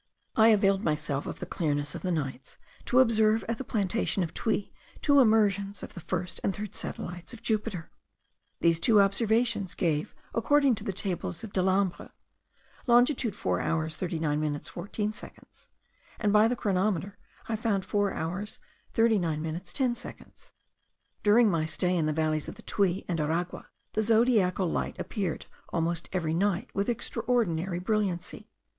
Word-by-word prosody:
I 220 0 +6
availed 200 -2 +4
myself 150 -3 -1
of - - -5
the - - -4
clearness 145 -4 -1
of - - -6
the 185 - -1
nights, 135 -5 -4 0.3
to 250 +1 +5
observe 220 -3 +3
at 230 0 -2
the - - -3
plantation 205 -3 0
of 165 - -5
Tuy 220 -3 -1 0.3
two 285 -1 +4
emersions 205 -4 +3
of - - -8
the - - -8
first 180 +1 -3
and 195 - 0
third 210 -1 -6
satellites 175 +6 -6
of 220 - -16
Jupiter. 210 -6 -1 0.7
These 165 -1 +4
two 215 +3 +5
observations 210 0 +2
gave, 155 -3 -1 0.2
according 280 +3 +3
to 210 -2 -4
the 210 - -2
tables 180 -2 -4
of 220 - -8
Delambre, 190 0 +1 0.8
longitude 245 -2 +3
4 90 -1 -1
hours 160 -1 -1
39 160 -4 -1
minutes 150 -1 -2
14 205 +4 -3
seconds; - - -14 0.5
and 210 -2 +1
by 210 +1 +6
the 245 - 0
chronometer 200 -1 -1 0.3
I 225 - -1
found 210 -4 0
4 205 0 +1
hours 180 +6 -4 0.4
39 200 -9 +2
minutes 160 +4 -5
10 255 -3 +1
seconds. - - -11 0.7
During 220 +3 +5
my 165 -5 +1
stay 175 +3 0
in 160 -3 +1
the - - +1
valleys 155 0 0
of - - -8
the - - -14
Tuy 195 -2 0
and 170 -2 -1
Aragua 165 +4 -2 0.3
the 215 - +1
zodiacal 220 -5 +3
light - - -2
appeared 195 -8 -3 0.3
almost 170 0 -1
every 165 -4 -1
night 190 +1 0
with 200 +3 0
extraordinary 225 -7 0
brilliancy. 190 -2 -2
195 Hz, 160 wpm, -28 LUFS, 170-220 Hz, 0.8 s, I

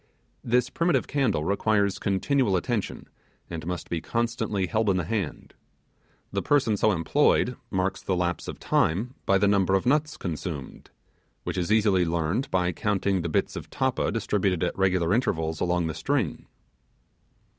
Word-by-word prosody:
This 125 +2 +1
primitive 165 -6 +1
candle 130 - 0
requires 100 +2 +1
continual 105 +2 +1
attention, 110 +3 -3 0.4
and 80 -1 -5
must 90 -2 -4
be 85 -2 -2
constantly 115 -3 -1
held 110 +2 0
in 95 - +2
the 90 - 0
hand. 100 +3 -4 0.8
The - - -1
person 130 -7 +2
so 110 +2 +3
employed 125 - +2
marks 95 0 -1
the 95 - -1
lapse 85 -1 -1
of - - -5
time 105 +11 +1
by 100 - +5
the 100 +1 +3
number 95 -1 +3
of 95 - 0
nuts 150 +4 +1
consumed, 80 -5 -6 0.5
which - - -3
is 90 +2 -1
easily 105 -4 +4
learned 85 - -1
by 90 -1 +1
counting 100 0 0
the 85 - -3
bits - - 0
of - - -7
tappa 130 -1 0
distributed 100 -5 0
at - - -1
regular 90 -2 +2
intervals 80 - 0
along 90 -1 +1
the 80 - -2
string. 130 - -2
100 Hz, 155 wpm, -26 LUFS, 90-115 Hz, 0.8 s, by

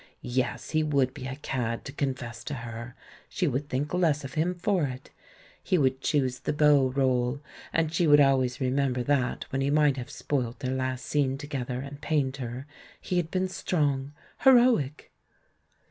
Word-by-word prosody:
Yes, 130 -1 -1
he 155 0 +2
would 140 -4 +1
be 130 - -7
a 130 - -4
cad 120 -5 -3
to - - -6
confess 130 -4 -4
to 145 +1 -3
her 120 0 -7 0.2
— - - -19
she 180 - 0
would 140 +1 -2
think 140 +4 -2
less 160 -5 +2
of 135 -1 -7
him 170 +3 0
for 180 -2 +1
it. 130 -1 -7 0.6
lie 185 - +5
would 130 -3 +1
choose 130 -4 0
the - - -2
beau 145 -2 +5
role 130 -1 +1 0.2
— - - -17
and 165 -1 0
she 170 0 +2
would 145 0 +7
alwavs 130 -3 +3
remember 130 -1 0
that, 130 -2 0
when 135 - -1
he 135 - +1
might 145 -2 +3
have 125 - -6
spoilt 125 -4 -2
their 130 0 -1
last 130 -1 -2
scene 135 -2 +1
together 130 -3 -4
and 140 +1 -9
pained 140 -3 0
her, 125 0 -5 0.3
he 180 - -2
had 170 -2 0
been 185 +1 0
strong, 145 -7 -1 0.3
heroic! 240 - +4
135 Hz, 185 wpm, -27 LUFS, 130-150 Hz, 0.6 s, would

